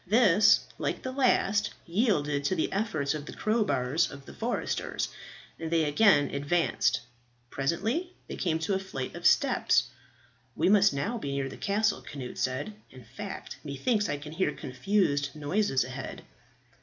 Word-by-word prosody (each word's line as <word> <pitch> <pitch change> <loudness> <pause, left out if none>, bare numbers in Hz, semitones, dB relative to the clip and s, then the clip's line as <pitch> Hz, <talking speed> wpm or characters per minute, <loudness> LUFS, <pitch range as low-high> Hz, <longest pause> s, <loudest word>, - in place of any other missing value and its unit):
This, 205 -2 +5 0.2
like - - -2
the 260 - -3
last, 225 -6 +2
yielded 165 - +1
to 185 - +1
the 160 - -1
efforts 160 -9 0
of 150 -1 -6
the - - -7
crowbars 170 - +1
of 140 -1 -11
the - - -11
foresters, 235 +2 -2 0.5
and 165 -1 -4
they 165 -1 +2
again 150 -1 +4
advanced. 145 -1 +1 0.5
Presently 225 - -1 0.2
they - - -6
came 165 -4 0
to 160 +5 -1
a 190 - +1
flight 160 -9 -5
of - - +1
steps. - - +3 0.7
"We - - +2
must 200 0 +6
now 200 - -2
be 140 -8 -4
near 135 -1 -2
the - - -9
castle," 215 +2 0
Cnut 130 -4 -7
said. 130 +11 -2 0.2
"In 130 -1 -13
fact, 135 - -8
methinks 205 - 0
I 145 - -1
can 150 +1 -9
hear 160 -1 0
confused 145 -1 0
noises 150 -1 +1
ahead." 130 +2 -7
165 Hz, 155 wpm, -29 LUFS, 140-210 Hz, 0.7 s, must